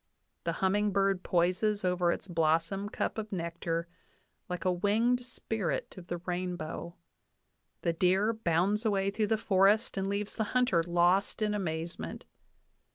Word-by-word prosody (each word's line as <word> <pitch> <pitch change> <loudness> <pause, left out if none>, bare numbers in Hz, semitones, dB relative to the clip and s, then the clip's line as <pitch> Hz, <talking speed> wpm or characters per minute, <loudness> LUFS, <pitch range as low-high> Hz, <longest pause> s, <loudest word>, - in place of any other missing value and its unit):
The 170 - 0
humming 205 +4 +1
bird 195 -1 +1
poises 185 +4 +1
over 180 -1 +2
its 195 - -4
blossom 165 +4 +1
cup 220 - -2
of 215 0 -6
nectar 170 -2 -2 0.6
like 180 +1 -4
a 185 - +4
winged 225 +7 +2
spirit 225 -5 -3
of 180 -2 -11
the 175 - -3
rainbow. 175 -1 -4 0.9
The 170 - +1
deer 190 +6 +2
bounds 200 +1 +1
away 200 -3 +1
through 215 +1 0
the 220 - +2
forest 205 +2 +3
and 195 0 0
leaves 200 +1 -2
the 220 - 0
hunter 245 -9 +3
lost 175 +5 +2
in 210 -1 +1
amazement. 170 -4 -4
190 Hz, 145 wpm, -31 LUFS, 175-210 Hz, 0.9 s, a